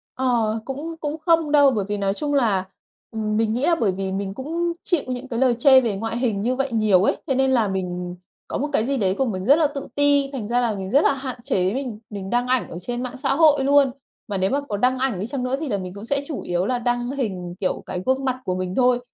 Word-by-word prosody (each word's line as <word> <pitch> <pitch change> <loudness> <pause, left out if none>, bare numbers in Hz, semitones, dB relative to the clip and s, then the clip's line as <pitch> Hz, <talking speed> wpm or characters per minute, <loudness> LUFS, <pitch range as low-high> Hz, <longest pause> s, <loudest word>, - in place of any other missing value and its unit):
Ờ, 235 -4 +1
cũng 290 +5 -5
cũng 300 0 -3
không 330 -3 +3
đâu 285 -2 +6
bởi 210 -6 -1
vì 205 - -1
nói 195 -1 0
chung 290 +6 -3
là 215 -9 +2 0.5
ừm, 215 -1 -2
mình 220 -1 +1
nghĩ 245 +4 -1
là 345 - +4
bởi 220 -10 +1
vì 190 +1 -3
mình 195 0 -3
cũng 335 +8 -2
chịu 345 -5 +1
những 255 +1 -4
cái 235 -3 -3
lời 255 -2 +3
chê 265 0 +7
về 225 -5 -1
ngoại 225 +3 -3
hình 230 -5 0
như 245 +4 0
vậy 270 0 -1
nhiều 215 -5 +3
ấy, - - +2
thế 270 - +1
nên 265 0 +2
là 235 -5 +3
mình 180 -2 -3 0.3
có - - -3
một 290 +3 -2
cái 220 - +2
gì 275 +2 0
đấy 190 -5 +1
của 270 - +2
mình 190 -6 -3
rất 280 - +7
là 315 -1 +3
tự 285 -1 -6
ti, 285 -1 +3
thành 235 -6 -4
ra 240 +2 +1
là 230 -3 0
mình 190 -1 -5
rất 280 +8 +4
là - - +4
hạn 265 -2 -6
chế 190 -8 0
mình 250 -5 -4
mình 195 -2 -6
đăng 245 +2 +1
ảnh 255 -1 +1
ở - - -7
trên 240 +6 -4
mạng 255 +1 -6
xã 270 +1 0
hội 295 -3 +5
luôn. 280 -1 +4 0.4
Mà 205 -3 -2
nếu 190 +1 +1
mà 280 +2 0
có 215 -8 -4
đăng 250 +4 +2
ảnh 255 -8 0
đi 205 - -3
chăng 260 0 -3
nữa 255 +1 0
thì 310 -2 -4
là 205 - 0
mình 185 -1 -6
cũng 200 +2 -9
sẽ 280 +3 0
chủ 300 - -4
yếu 175 +1 -1
là 250 +1 0
đăng 245 +1 -1
hình, 190 -10 -4
kiểu, 185 - -2
cái 180 - -4
gương 265 +1 +1
mặt 260 -1 +1
của 185 - -1
mình 185 0 -3
thôi, 250 -1 +3
245 Hz, 280 wpm, -23 LUFS, 200-275 Hz, 0.5 s, chê